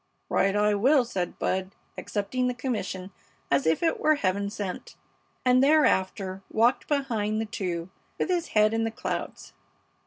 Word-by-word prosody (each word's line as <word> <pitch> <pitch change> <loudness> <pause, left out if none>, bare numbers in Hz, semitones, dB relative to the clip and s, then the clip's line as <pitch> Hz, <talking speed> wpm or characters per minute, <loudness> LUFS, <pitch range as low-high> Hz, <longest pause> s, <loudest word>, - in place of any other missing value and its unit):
"Right 195 +1 +2
I 210 0 +3
will," 255 +6 +4
said 180 -6 -3
Bud, 190 +1 -2 0.2
accepting 250 +5 -2
the 250 - -1
commission 205 -7 -4 0.4
as 140 +2 +2
if 160 - +2
it 325 - +1
were 310 0 +4
Heaven 200 -5 0
sent, 200 -3 -6 0.5
and 255 +1 +5
thereafter 195 -10 +2
walked 235 +3 +2
behind 225 -7 0
the 225 - -1
two 175 -5 -4 0.3
with - - 0
his 350 -2 0
head 215 0 +3
in 225 0 +1
the 225 - 0
clouds. 225 - -5
215 Hz, 155 wpm, -27 LUFS, 190-255 Hz, 0.5 s, and